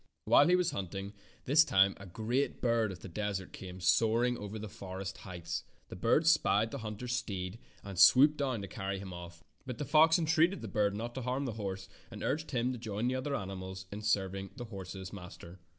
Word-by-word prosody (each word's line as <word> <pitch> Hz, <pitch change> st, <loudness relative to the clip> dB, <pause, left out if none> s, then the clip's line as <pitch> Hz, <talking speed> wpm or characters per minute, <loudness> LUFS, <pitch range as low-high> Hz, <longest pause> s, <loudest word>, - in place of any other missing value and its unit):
While 145 Hz, -, +6 dB
he 180 Hz, -, +5 dB
was 180 Hz, -1 st, +2 dB
hunting 95 Hz, +1 st, -5 dB, 0.3 s
this 150 Hz, +5 st, +6 dB
time 95 Hz, -7 st, +4 dB
a 100 Hz, -, -10 dB
great 115 Hz, +9 st, -1 dB
bird 115 Hz, -3 st, +1 dB
of 90 Hz, -, -9 dB
the -, -, -8 dB
desert 100 Hz, 0 st, -3 dB
came 95 Hz, -1 st, -8 dB
soaring 115 Hz, +7 st, +3 dB
over 105 Hz, -1 st, -6 dB
the 110 Hz, 0 st, -6 dB
forest 95 Hz, -1 st, -7 dB
heights. 85 Hz, -3 st, -5 dB, 0.3 s
The -, -, -7 dB
bird -, -, +2 dB
spied 110 Hz, +3 st, +3 dB
the 140 Hz, -, -5 dB
hunter's 115 Hz, +2 st, -4 dB
steed 95 Hz, -4 st, -3 dB, 0.2 s
and 100 Hz, -3 st, -6 dB
swooped 145 Hz, +9 st, +7 dB
down 130 Hz, -7 st, -1 dB
to -, -, -5 dB
carry 95 Hz, +1 st, -4 dB
him 95 Hz, -1 st, -7 dB
off, 85 Hz, 0 st, -10 dB, 0.2 s
but 125 Hz, -2 st, -6 dB
the 145 Hz, -, -3 dB
fox 160 Hz, +3 st, +6 dB
entreated 165 Hz, +3 st, +2 dB
the -, -, -4 dB
bird 105 Hz, -2 st, +1 dB
not 115 Hz, +3 st, -4 dB
to'harm 130 Hz, +2 st, -2 dB
the 125 Hz, -, -2 dB
horse 95 Hz, -3 st, -5 dB, 0.2 s
and -, -, -8 dB
urged 160 Hz, +2 st, -1 dB
him 125 Hz, -1 st, 0 dB
to 125 Hz, -, -5 dB
join 110 Hz, +1 st, -2 dB
the 130 Hz, -, -1 dB
other 140 Hz, +2 st, -2 dB
animals 95 Hz, -2 st, -6 dB
in 105 Hz, +1 st, -6 dB
serving 95 Hz, -2 st, 0 dB
the 120 Hz, -2 st, -6 dB
horse's 95 Hz, -3 st, -8 dB
mas 90 Hz, -3 st, -9 dB
ter. 85 Hz, +2 st, -12 dB
105 Hz, 210 wpm, -32 LUFS, 95-125 Hz, 0.3 s, swooped